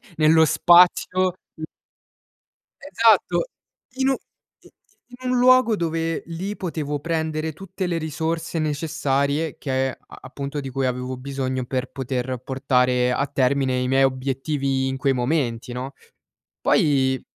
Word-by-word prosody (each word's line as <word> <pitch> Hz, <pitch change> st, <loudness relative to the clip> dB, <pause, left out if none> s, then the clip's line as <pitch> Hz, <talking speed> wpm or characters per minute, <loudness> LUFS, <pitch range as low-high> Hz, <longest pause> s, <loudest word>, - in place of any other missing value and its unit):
nello 160 Hz, +1 st, +5 dB
spazio, 180 Hz, +2 st, +4 dB, 0.2 s
mhmm 155 Hz, -, -5 dB, 1.2 s
Esatto. 275 Hz, -, +2 dB, 0.5 s
In 265 Hz, 0 st, +2 dB
u -, -, +3 dB, 0.5 s
i -, -, -19 dB
i -, -, -22 dB, 0.5 s
in 250 Hz, -, -1 dB
un 250 Hz, -, +2 dB
luogo 255 Hz, -2 st, +5 dB
dove 165 Hz, -1 st, -2 dB
lì 185 Hz, +5 st, -5 dB
potevo 150 Hz, -5 st, -3 dB
prendere 160 Hz, 0 st, -2 dB
tutte 190 Hz, +1 st, -5 dB
le 170 Hz, -1 st, -1 dB
risorse 160 Hz, +1 st, -3 dB
necessarie 150 Hz, 0 st, -1 dB
che 130 Hz, -1 st, -1 dB
a -, -, -13 dB
a -, -, -13 dB
appunto 140 Hz, +2 st, -6 dB
di 135 Hz, -1 st, -5 dB
cui 135 Hz, 0 st, -2 dB
avevo 125 Hz, 0 st, -3 dB
bisogno 130 Hz, -1 st, -3 dB
per 130 Hz, 0 st, -3 dB
poter 130 Hz, -1 st, -3 dB
portare 125 Hz, -2 st, +1 dB
a 140 Hz, -, 0 dB
termine 130 Hz, -1 st, +1 dB
i 125 Hz, -, -1 dB
miei 135 Hz, +1 st, +3 dB
obiettivi 135 Hz, +1 st, -1 dB
in 130 Hz, 0 st, -2 dB
quei 135 Hz, 0 st, +1 dB
momenti, 125 Hz, -2 st, -1 dB
no, 130 Hz, +2 st, -5 dB, 0.7 s
poi 130 Hz, -3 st, +2 dB
140 Hz, 140 wpm, -23 LUFS, 130-165 Hz, 1.2 s, nello